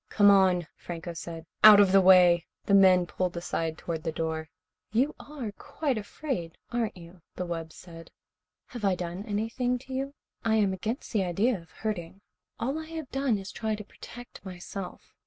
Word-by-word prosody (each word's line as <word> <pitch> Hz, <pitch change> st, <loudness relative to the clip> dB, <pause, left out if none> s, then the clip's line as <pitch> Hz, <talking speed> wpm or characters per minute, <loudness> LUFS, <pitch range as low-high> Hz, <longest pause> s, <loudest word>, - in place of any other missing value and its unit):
"Come 205 Hz, -1 st, +6 dB
on," 185 Hz, -3 st, +4 dB
Franco 170 Hz, 0 st, -6 dB
said. 165 Hz, 0 st, -7 dB, 0.2 s
"Out 210 Hz, -1 st, +11 dB
of 200 Hz, -2 st, +6 dB
the 195 Hz, 0 st, +7 dB
way." 180 Hz, -2 st, +6 dB, 0.2 s
The 200 Hz, -, +1 dB
men 185 Hz, -2 st, +6 dB
pulled 180 Hz, 0 st, -2 dB
aside 165 Hz, -2 st, -2 dB
toward 165 Hz, -2 st, -4 dB
the 160 Hz, -, -2 dB
door. 160 Hz, 0 st, -3 dB, 0.4 s
"You 260 Hz, +7 st, +2 dB
are 275 Hz, -7 st, -6 dB
quite 285 Hz, -5 st, -2 dB
afraid, 205 Hz, -, -5 dB
aren't 235 Hz, -5 st, -1 dB
you?" 170 Hz, +1 st, -13 dB
the 180 Hz, -, -3 dB
wub 165 Hz, -2 st, -4 dB
said. 165 Hz, -1 st, -12 dB, 0.6 s
"Have 240 Hz, -3 st, -8 dB
I 195 Hz, -2 st, +3 dB
done 180 Hz, +2 st, -5 dB
anything 225 Hz, +4 st, -1 dB
to 265 Hz, +1 st, -10 dB
you? 275 Hz, +2 st, -3 dB, 0.3 s
I 225 Hz, -1 st, +2 dB
am 205 Hz, -3 st, +3 dB
against 220 Hz, +9 st, -4 dB
the 205 Hz, -3 st, +2 dB
idea 200 Hz, +8 st, +1 dB
of 165 Hz, -, -20 dB
hurting. 195 Hz, -3 st, -5 dB, 0.4 s
All 270 Hz, +6 st, -1 dB
I 315 Hz, -, -7 dB
have 320 Hz, -4 st, -7 dB
done 270 Hz, -5 st, +1 dB
is 195 Hz, 0 st, -7 dB
try 220 Hz, -1 st, -2 dB
to 210 Hz, -, -8 dB
protect 245 Hz, +4 st, -12 dB
myself. 185 Hz, 0 st, -8 dB
195 Hz, 180 wpm, -28 LUFS, 175-230 Hz, 0.6 s, Out